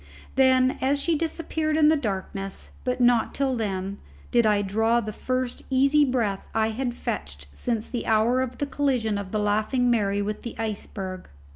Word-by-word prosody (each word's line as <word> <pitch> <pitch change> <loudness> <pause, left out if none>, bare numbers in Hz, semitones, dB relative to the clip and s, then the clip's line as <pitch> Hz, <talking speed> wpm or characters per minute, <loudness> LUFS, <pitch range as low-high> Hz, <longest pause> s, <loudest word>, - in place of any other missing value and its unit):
Then, 260 -1 +4
as 275 +2 +2
she 330 +3 +1
disappeared 315 -1 -1
in 305 -1 +6
the 315 - +5
darkness, 195 -6 -4
but 250 0 -1
not 240 -2 +3
till 270 -2 +1
then, 200 -3 -3 0.3
did 235 -2 +4
I 205 -1 +3
draw 225 +4 +2
the 215 -2 -4
first 255 +2 -2
easy 275 +3 +4
breath 230 -7 0
I 220 0 +2
had 245 +1 -3
fetched 70 - -5
since 225 - -2
the 240 - -4
hour 225 +4 +3
of 255 -1 -3
the 285 - -1
collision 255 -7 0
of 195 -2 -7
the 215 - 0
Laughing 215 +4 +1
Mary 200 -3 +1
with 210 +1 -3
the 235 - -7
iceberg. 200 -4 -5
235 Hz, 175 wpm, -25 LUFS, 205-260 Hz, 0.3 s, in